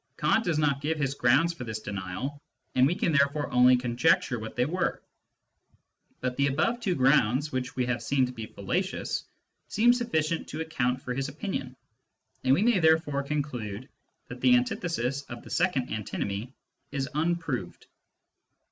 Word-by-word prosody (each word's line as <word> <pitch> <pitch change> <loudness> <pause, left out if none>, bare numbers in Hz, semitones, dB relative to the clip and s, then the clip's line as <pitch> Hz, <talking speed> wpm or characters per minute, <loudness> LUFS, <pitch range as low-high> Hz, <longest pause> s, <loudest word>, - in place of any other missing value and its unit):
Kant 225 - +2
does 170 -6 0
not 145 -2 +1
give 155 +2 -1
his 140 -3 0
grounds 140 +6 +3
for 155 - -8
this 110 -2 -4
denial, 105 +8 -5 0.3
and 130 +1 +5
we 170 - 0
can 170 - 0
therefore 140 0 +2
only 125 +1 +6
con 120 -1 -3
jecture 125 -3 +3
what 110 - -7
they 125 - +2
were. 180 +5 -1 1.2
But 125 -1 -1
the 140 0 +3
above 155 - +1
two 195 -7 0
grounds, 135 +1 +3
which 130 0 -3
we 125 - 0
have 125 -1 -1
seen 130 +3 +2
to 125 - -5
be 115 -3 -7
fallacious, 180 - -2 0.4
seem 235 +3 +4
suflicient 170 -10 0
to 155 - -5
account 130 -5 -1
for 125 - -3
his 135 +2 -2
opinion, 145 -5 -4 0.7
and 130 +1 +5
we 190 - +2
may 235 -4 +4
therefore 160 -3 +3
conclude 130 -6 -4 0.4
that 125 0 -9
the 125 -1 +6
antithesis 130 +1 -1
of 120 0 -8
the - - -12
second 170 -8 +1
antinomy 105 +1 -3 0.4
is 135 -1 -2
unproved. 155 - -2
135 Hz, 165 wpm, -28 LUFS, 125-160 Hz, 1.2 s, only